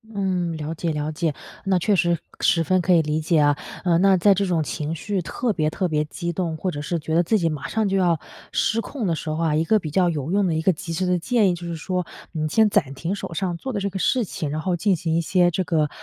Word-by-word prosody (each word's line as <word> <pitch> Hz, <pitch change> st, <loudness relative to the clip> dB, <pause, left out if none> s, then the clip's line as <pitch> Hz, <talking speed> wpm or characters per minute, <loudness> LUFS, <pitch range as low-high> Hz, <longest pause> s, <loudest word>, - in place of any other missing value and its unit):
嗯， 180 Hz, -4 st, -1 dB
了 155 Hz, +1 st, -4 dB
解 165 Hz, 0 st, -2 dB
了 150 Hz, 0 st, -2 dB
解， 160 Hz, -1 st, -1 dB, 0.3 s
那 190 Hz, -1 st, +3 dB
确 205 Hz, +3 st, +2 dB
实 175 Hz, -1 st, +2 dB, 0.2 s
十 165 Hz, -1 st, +3 dB
分 185 Hz, +2 st, +2 dB
可 180 Hz, +1 st, +3 dB
以 165 Hz, -, +6 dB
理 155 Hz, 0 st, -1 dB
解 160 Hz, 0 st, +2 dB
啊。 145 Hz, -1 st, +3 dB, 0.3 s
呃， 170 Hz, -2 st, +3 dB
那 195 Hz, +1 st, +5 dB
在 195 Hz, +3 st, +5 dB
这 200 Hz, +1 st, 0 dB
种 170 Hz, -4 st, +1 dB
情 150 Hz, +4 st, -3 dB
绪 195 Hz, +3 st, -2 dB
特 235 Hz, +7 st, -2 dB
别 155 Hz, -5 st, 0 dB
特 185 Hz, +3 st, -1 dB
别 150 Hz, -2 st, 0 dB
激 170 Hz, +3 st, -4 dB
动， 170 Hz, -2 st, -2 dB
或 180 Hz, +3 st, -2 dB
者 145 Hz, -, -5 dB
是 170 Hz, +3 st, -2 dB
觉 160 Hz, +1 st, -4 dB
得 175 Hz, -, +4 dB
自 220 Hz, +5 st, +2 dB
己 165 Hz, -3 st, +1 dB
马 150 Hz, -2 st, -4 dB
上 220 Hz, -2 st, 0 dB
就 195 Hz, -, +1 dB
要 175 Hz, -3 st, +3 dB, 0.3 s
失 225 Hz, -, +1 dB
控 230 Hz, 0 st, -4 dB
的 165 Hz, -, +1 dB
时 155 Hz, -, -5 dB
候 155 Hz, -, -2 dB
啊， 155 Hz, -2 st, +2 dB
一 160 Hz, -, +2 dB
个 215 Hz, +3 st, +3 dB
比 155 Hz, -, -5 dB
较 180 Hz, +2 st, +3 dB
有 155 Hz, 0 st, -3 dB
用 200 Hz, 0 st, +2 dB
的 165 Hz, -, 0 dB
一 160 Hz, -, 0 dB
个 190 Hz, -, +4 dB
及 170 Hz, 0 st, -6 dB
时 185 Hz, +3 st, -1 dB
的 180 Hz, 0 st, +2 dB
建 215 Hz, 0 st, +2 dB
议， 175 Hz, -, +1 dB
就 175 Hz, 0 st, -7 dB
是 170 Hz, -, -3 dB
说， 180 Hz, +2 st, -2 dB, 0.3 s
你 155 Hz, -2 st, -2 dB
先 215 Hz, +6 st, +4 dB
暂 165 Hz, -10 st, +1 dB
停 165 Hz, +8 st, -3 dB
手 170 Hz, -, -6 dB
上 175 Hz, -1 st, -2 dB
做 265 Hz, +7 st, -5 dB
的 205 Hz, -, -1 dB
这 200 Hz, 0 st, -1 dB
个 190 Hz, 0 st, -5 dB
事 250 Hz, +4 st, +2 dB
情， 160 Hz, -6 st, -4 dB
然 155 Hz, +2 st, -3 dB
后 185 Hz, 0 st, 0 dB
进 195 Hz, +1 st, +2 dB
行 165 Hz, -1 st, -1 dB
一 -, -, +3 dB
些 175 Hz, +1 st, +3 dB
这 185 Hz, -, 0 dB
个， 155 Hz, -4 st, +1 dB
175 Hz, 305 characters per minute, -23 LUFS, 160-190 Hz, 0.3 s, 以